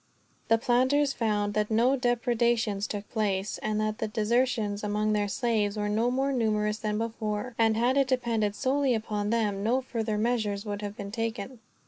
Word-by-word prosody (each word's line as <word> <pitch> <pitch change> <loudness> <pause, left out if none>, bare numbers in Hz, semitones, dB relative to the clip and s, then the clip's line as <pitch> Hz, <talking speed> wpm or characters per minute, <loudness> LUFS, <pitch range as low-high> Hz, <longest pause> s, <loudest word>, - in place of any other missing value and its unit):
The 225 - +4
planters 260 +5 +2
found 210 -4 0
that 210 0 0
no 235 +5 +3
depredations 235 -4 +1
took 205 -1 -5
place, 205 -3 -1
and 215 0 -1
that 215 0 -1
the 220 - -1
desertions 215 -1 0
among 210 +1 0
their 205 -1 +1
slaves 215 -2 0
were 210 0 -1
no 225 +3 +1
more 270 +2 0
numerous 215 -3 0
than 210 -1 -2
before; 225 +1 -3
and 225 -1 +3
had 245 +4 +2
it 275 -1 +3
depended 230 -5 0
solely 265 +1 +1
upon 210 -2 -2
them, 210 -3 0
no 240 +4 +2
further 225 -4 -3
measures 215 -2 0
would 205 -1 -4
have 205 0 -6
been 200 0 -6
taken. 225 +2 -4
220 Hz, 175 wpm, -28 LUFS, 210-240 Hz, -, The